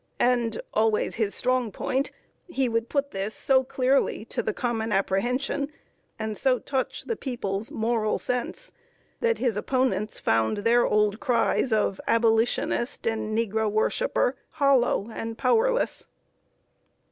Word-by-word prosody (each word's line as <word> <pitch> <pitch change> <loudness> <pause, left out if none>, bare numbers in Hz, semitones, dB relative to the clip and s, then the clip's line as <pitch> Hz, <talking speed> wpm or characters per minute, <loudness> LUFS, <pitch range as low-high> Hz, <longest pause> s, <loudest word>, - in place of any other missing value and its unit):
And 240 -3 +2
always 220 0 +2
his 215 -3 0
strong 255 -3 0
point 265 +7 -1 0.4
he 270 -7 0
would 230 0 -1
put 280 -1 -1
this 195 +2 -3
so 265 -1 +3
clearly 260 -3 +1
to - - 0
the - - -1
common 225 -1 -2
apprehension, 250 +9 0 0.5
and 220 -1 -3
so 255 +3 +2
touch 265 +1 -3
the 460 - -2
people's 220 - -3
moral 220 -1 0
sense, 250 - -3 0.5
that 470 -1 +1
his 240 -5 0
opponents 215 -4 0
found 110 - +1
their 230 +3 +3
old 210 0 +2
cries 250 -1 +1
of 210 -3 +1
"Abolitionist" 230 +2 +1
and 220 -1 -1
"Negro 220 -1 0
worshiper" 350 - +1 0.2
hollow 265 -7 +2
and 225 0 -5
powerless. 475 - +1
230 Hz, 130 wpm, -26 LUFS, 215-260 Hz, 0.5 s, so